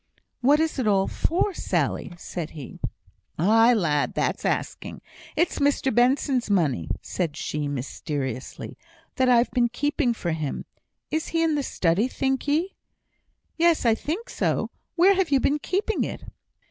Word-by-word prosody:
"What 285 Hz, +4 st, +4 dB
is 320 Hz, -3 st, 0 dB
it 245 Hz, -, 0 dB
all 195 Hz, -2 st, +3 dB
for, 365 Hz, +4 st, 0 dB
Sally?" 195 Hz, -, -1 dB
said 170 Hz, -1 st, -5 dB
he. 140 Hz, -, -9 dB, 0.6 s
"Aye, 225 Hz, +7 st, +5 dB
lad! 150 Hz, -8 st, +1 dB
that's -, -, -1 dB
asking. -, -, -2 dB, 0.4 s
It's 340 Hz, +3 st, +1 dB
Mr 280 Hz, -2 st, +2 dB
Benson's 250 Hz, 0 st, +2 dB
money," 145 Hz, -, +1 dB
said 165 Hz, -4 st, -3 dB
she, 150 Hz, -1 st, -2 dB
mysteriously, 135 Hz, -1 st, -5 dB, 0.4 s
"that 260 Hz, -2 st, +3 dB
I've 240 Hz, 0 st, +4 dB
been 240 Hz, -2 st, +2 dB
keeping 275 Hz, 0 st, 0 dB
for 175 Hz, -5 st, -2 dB
him. 155 Hz, -3 st, -3 dB, 0.5 s
Is 315 Hz, +1 st, -1 dB
he 330 Hz, 0 st, +1 dB
in 325 Hz, -1 st, +2 dB
the 295 Hz, -, +1 dB
study, 190 Hz, -3 st, +1 dB
think 265 Hz, +1 st, -1 dB
ye?" 325 Hz, +7 st, +1 dB, 0.8 s
"Yes! 335 Hz, -4 st, +3 dB
I 230 Hz, -, +5 dB
think 335 Hz, -, -4 dB
so. -, -, -1 dB, 0.2 s
Where 370 Hz, +3 st, +6 dB
have 380 Hz, -3 st, +1 dB
you 275 Hz, -2 st, +4 dB
been 290 Hz, +3 st, +1 dB
keeping 400 Hz, +8 st, -1 dB
it?" -, -, -5 dB
250 Hz, 150 wpm, -25 LUFS, -, 0.8 s, Where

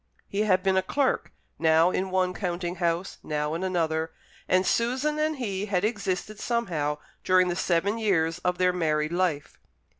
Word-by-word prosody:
He 200 Hz, -, -4 dB
had 185 Hz, -3 st, +3 dB
been 190 Hz, -1 st, +2 dB
a -, -, +4 dB
clerk, 270 Hz, +8 st, 0 dB, 0.3 s
now 160 Hz, +2 st, +4 dB
in 190 Hz, +1 st, -1 dB
one 185 Hz, -1 st, +1 dB
counting 175 Hz, -1 st, -3 dB
house, 170 Hz, +1 st, -1 dB
now 150 Hz, 0 st, -2 dB
in 170 Hz, +3 st, -3 dB
another, 165 Hz, -3 st, 0 dB, 0.4 s
and 185 Hz, +1 st, +3 dB
Susan 260 Hz, +8 st, +1 dB
and 310 Hz, 0 st, +1 dB
he 205 Hz, -6 st, -3 dB
had 195 Hz, -1 st, +1 dB
existed 210 Hz, -1 st, -2 dB
somehow 165 Hz, -12 st, -1 dB, 0.3 s
during 185 Hz, -1 st, +4 dB
the 175 Hz, -, -1 dB
seven 190 Hz, +5 st, +1 dB
years 170 Hz, -6 st, +1 dB
of 180 Hz, 0 st, -1 dB
their 180 Hz, 0 st, +3 dB
married 155 Hz, -3 st, 0 dB
life. 175 Hz, -5 st, -1 dB
185 Hz, 170 wpm, -27 LUFS, 165-200 Hz, 0.4 s, a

